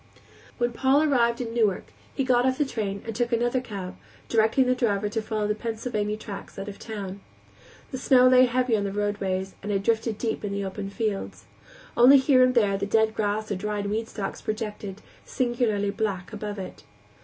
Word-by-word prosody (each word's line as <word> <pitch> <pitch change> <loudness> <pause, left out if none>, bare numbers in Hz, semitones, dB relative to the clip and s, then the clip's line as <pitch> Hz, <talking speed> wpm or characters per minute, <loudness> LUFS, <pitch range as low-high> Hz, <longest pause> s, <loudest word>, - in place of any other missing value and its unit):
When 240 -1 0
Paul 270 +4 +3
arrived 240 -5 +2
in 230 -2 -4
Newark 215 -5 0 0.2
he 270 - 0
got 245 -1 +3
off 260 0 +1
the 295 - +2
train 205 -6 -4
and 225 -1 -5
took 240 +1 0
another 240 +2 +1
cab, 195 -6 -7 0.3
directing 225 +3 +3
the 255 - +3
driver 210 -5 0
to 225 +2 -2
follow 215 -1 -2
the 210 - +1
Pennsylvania 215 -1 -3
tracks 205 -2 -9
out 195 +1 -5
of 200 - -8
the - - -10
town. 200 -3 -6 0.7
The 260 - -4
snow 255 -1 +5
lay 255 0 +6
heavy 250 -1 +1
on 205 - 0
the 200 - -2
roadways 195 -2 -2
and 205 - -4
had 195 -1 0
drifted 225 0 0
deep 225 -1 -2
in 200 -1 -3
the 200 0 -2
open 195 +1 -5
fields. 210 -1 -3 0.5
Only 250 +4 +8
here 265 -1 +4
and 255 0 +3
there 200 -4 +3
the 200 - -2
dead 220 +1 +2
grass 215 0 -1
or - - 0
dried 205 +1 -3
weed 225 +1 -2
stalks 200 -3 -5
projected, 210 -2 -5 0.2
singularly 235 -5 0
black, 200 -3 -3
above 210 0 -5
it. 190 -1 -8
220 Hz, 200 wpm, -26 LUFS, 205-240 Hz, 0.7 s, Only